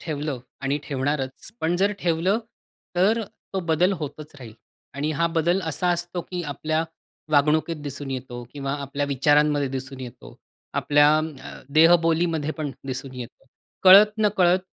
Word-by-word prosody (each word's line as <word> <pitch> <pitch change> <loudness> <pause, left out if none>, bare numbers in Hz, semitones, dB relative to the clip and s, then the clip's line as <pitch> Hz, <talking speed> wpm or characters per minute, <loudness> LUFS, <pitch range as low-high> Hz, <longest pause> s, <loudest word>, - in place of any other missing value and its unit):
ठेवलं 150 -3 -3 0.2
आणि 140 +1 -1
ठेवणारच. 135 +1 -3
पण 170 +2 +1
जर 200 +3 +2
ठेवलं, 180 +4 +1 0.6
तर 205 +6 +3
अ, - - -4 0.3
तो 190 - 0
बदल 170 +4 +3
होतच 150 0 -7
राहील 120 -4 -10 0.4
आणि 145 +2 -2
हा 170 +3 +1
बदल 170 +3 +2
असा 160 +3 -1
असतो 175 +1 -3
की 180 -1 -3
आपल्या 155 +2 -1 0.5
वागणुकीत 155 +3 +3
दिसून 140 -1 -6
येतो 125 -2 -5
किंवा 140 -1 -4
आपल्या 140 +1 -3
विचारांमध्ये 145 +1 +2
दिसून 135 0 -6
येतो, 115 - -10 0.4
आपल्या 145 0 +4
अं, 155 -2 -4 0.4
देहबोलीमध्ये 165 -1 +4
पण 150 -2 -2 0.2
दिसून 130 0 -5
येतो. 125 -2 -9 0.4
कळत 200 +3 +8
नकळत 185 -4 +3
150 Hz, 145 wpm, -24 LUFS, 140-175 Hz, 0.6 s, कळत